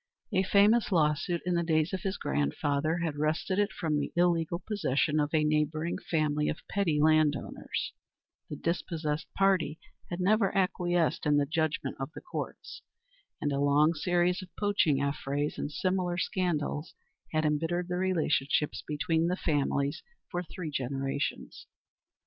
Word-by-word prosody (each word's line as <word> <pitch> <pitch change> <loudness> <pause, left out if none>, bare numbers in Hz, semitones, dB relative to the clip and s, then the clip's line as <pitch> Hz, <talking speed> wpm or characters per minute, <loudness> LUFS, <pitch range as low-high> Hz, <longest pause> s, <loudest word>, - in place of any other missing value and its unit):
A 190 - +4
famous 205 +4 +4
law 155 -4 +4
suit, 170 +4 -3
in 180 - +1
the 170 - +2
days 160 -1 +1
of 190 - -2
his 195 -1 -2
grandfather, 140 - 0
had 155 -3 -2
wrested 160 +6 0
it 205 0 +2
from 155 -7 -1
the 145 - -3
illegal 170 -1 +2
possession 160 -6 0
of 145 0 0
a 155 -2 +3
neighbouring 155 +2 0
family 150 -2 0
of 155 - -5
petty 175 -7 +1
landowners; 155 -1 +1 0.6
the - - -4
dispossessed 160 -1 -2
party 190 -6 +2 0.3
had 175 - -4
never 200 +1 +2
acquiesced 175 -4 +1
in 145 0 +4
the 145 - +3
judgment 155 -3 -1
of 135 +3 -4
the - - -9
Courts, 355 - -6 0.6
and 145 - -1
a 140 - 0
long 145 +3 +4
series 175 +3 +1
of 185 - -10
poaching 200 -9 +2
affrays 140 +1 -2
and 145 - -3
similar 180 +1 0
scandals 170 -4 -1 0.4
had 155 0 +1
embittered 165 +4 0
the 180 -1 -2
relationships 155 -6 +1
between 160 +2 +1
the 180 +1 0
families 140 -3 0 0.3
for 175 - -1
three 165 -2 -6
generations. 135 +1 -3
160 Hz, 150 wpm, -30 LUFS, 150-180 Hz, 0.6 s, A